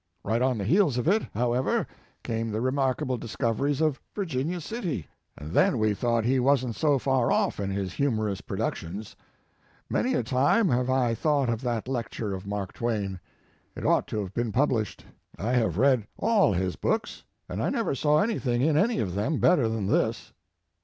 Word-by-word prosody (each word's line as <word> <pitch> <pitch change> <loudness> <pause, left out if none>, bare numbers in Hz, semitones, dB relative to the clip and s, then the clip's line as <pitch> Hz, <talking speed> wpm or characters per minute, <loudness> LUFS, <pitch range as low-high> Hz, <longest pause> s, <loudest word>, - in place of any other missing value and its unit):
Right 115 +3 0
on 130 -2 +2
the 100 - -2
heels 150 - +3
of 125 - -1
it, 210 +5 +4
however, 120 +3 +1 0.4
came 115 0 -2
the 110 0 -2
remarkable 130 0 0
discoveries 130 +5 -1
of 155 -4 +1
Virginia 165 -3 -2
City, 175 - -4 0.3
and 75 +2 -8
then 120 - +3
we 110 -1 +2
thought 115 +1 0
he 130 +2 +2
wasn 130 -1 +2
t - - -12
so 150 -3 +3
far 130 -2 +1
off - - +1
in 100 -1 -2
his 95 -2 -3
humorous 110 -8 0
productions. 95 +5 -4 0.8
Many 255 +1 +1
a - - +1
time 140 - +3
have 125 +1 +1
I 130 -3 +2
thought 140 0 +1
of 115 0 -2
that 120 -3 -2
lecture 115 -5 -3
of 95 +1 -6
Mark 100 -2 -4
Twain. 105 -5 -2 0.6
It - - -6
ought - - +3
to 110 - -3
have 95 -1 -6
been 120 0 -1
published. 120 -3 0 0.3
I 110 +6 -2
have 110 -9 +1
read 125 -3 +3
all 210 - +3
his 90 0 -1
books, - - -2 0.2
and - - -4
I - - +1
never - - 0
saw 150 +4 +3
anything 130 - 0
in 155 0 +3
any 220 +6 +2
of 90 -5 -1
them 105 - 0
better 145 -10 +3
than 110 -3 -2
this." 110 +2 0
120 Hz, 185 wpm, -27 LUFS, 110-140 Hz, 0.8 s, it